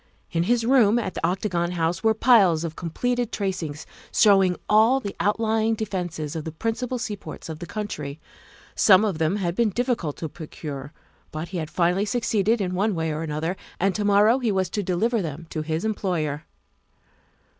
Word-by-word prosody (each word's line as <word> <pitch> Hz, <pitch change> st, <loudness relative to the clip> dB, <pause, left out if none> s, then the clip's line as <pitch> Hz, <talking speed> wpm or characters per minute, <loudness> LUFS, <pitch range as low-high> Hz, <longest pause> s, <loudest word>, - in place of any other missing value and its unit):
In 165 Hz, -, +1 dB
his 240 Hz, -1 st, +2 dB
room 235 Hz, -4 st, +5 dB
at 215 Hz, -6 st, -2 dB
the -, -, -6 dB
Octagon 180 Hz, -2 st, 0 dB
House 170 Hz, +1 st, -1 dB
were 220 Hz, 0 st, +3 dB
piles 200 Hz, -9 st, +5 dB
of 165 Hz, -2 st, -4 dB
completed 245 Hz, +8 st, -2 dB
tracings 180 Hz, -7 st, -3 dB, 0.3 s
showing 195 Hz, -4 st, +5 dB
all 225 Hz, +5 st, +5 dB
the 200 Hz, -6 st, -6 dB
outlying 220 Hz, +1 st, +1 dB
defences 175 Hz, -8 st, -4 dB
of 160 Hz, -, -3 dB
the 160 Hz, -, -5 dB
principal 230 Hz, +8 st, -2 dB
seaports 215 Hz, -7 st, -6 dB
of 155 Hz, -1 st, -6 dB
the 175 Hz, -, -7 dB
country. 180 Hz, -9 st, -5 dB, 0.5 s
Some 200 Hz, +1 st, +5 dB
of 190 Hz, -7 st, -2 dB
them 160 Hz, +4 st, +1 dB
had 180 Hz, -4 st, -1 dB
been 230 Hz, +3 st, +2 dB
difficult 235 Hz, -, -1 dB
to 160 Hz, -, -4 dB
procure, 145 Hz, -2 st, -8 dB, 0.4 s
but 155 Hz, +2 st, -6 dB
he 180 Hz, -1 st, -3 dB
had 155 Hz, -2 st, -4 dB
finally 180 Hz, +4 st, +1 dB
suc 240 Hz, +2 st, -2 dB
ceeded 215 Hz, +2 st, +2 dB
in 185 Hz, -2 st, -1 dB
one 200 Hz, +2 st, +1 dB
way 160 Hz, -1 st, -1 dB
or 155 Hz, +1 st, -3 dB
another, 160 Hz, +3 st, -2 dB, 0.2 s
and 195 Hz, +1 st, +2 dB
to 210 Hz, -, -2 dB
morrow 205 Hz, +5 st, +4 dB
he 235 Hz, -4 st, 0 dB
was 190 Hz, -2 st, 0 dB
to 210 Hz, -, -1 dB
deliver 205 Hz, +5 st, 0 dB
them 165 Hz, -1 st, -5 dB
to 155 Hz, -, -2 dB
his 160 Hz, +4 st, -2 dB
employer. 170 Hz, -8 st, -2 dB
190 Hz, 185 wpm, -24 LUFS, 165-220 Hz, 0.5 s, room